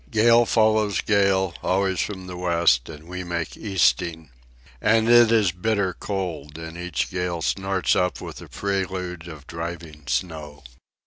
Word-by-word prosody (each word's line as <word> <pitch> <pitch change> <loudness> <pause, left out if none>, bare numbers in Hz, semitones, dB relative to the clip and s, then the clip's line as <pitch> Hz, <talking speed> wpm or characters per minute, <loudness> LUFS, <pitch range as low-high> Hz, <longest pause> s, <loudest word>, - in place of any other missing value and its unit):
Gale 115 +1 +5
follows 110 -2 +3
gale, 95 -3 +2
always 95 -1 +1
from 95 -3 -3
the 90 -1 -7
west, 85 -8 +2
and 80 0 -11
we 90 +1 -5
make 85 -2 -4
easting. 80 - 0 0.5
And 115 0 +3
it 120 -1 +7
is 110 -6 +4
bitter 95 +1 0
cold, 85 -8 -5
and 80 0 -8
each 90 -2 -3
gale 90 -3 -2
snorts 95 0 +1
up 90 0 0
with - - -8
a - - -10
prelude 95 -3 -3
of 75 -4 -10
driving 80 -3 -7
snow. 75 -4 -3
90 Hz, 145 wpm, -24 LUFS, 80-100 Hz, 0.5 s, it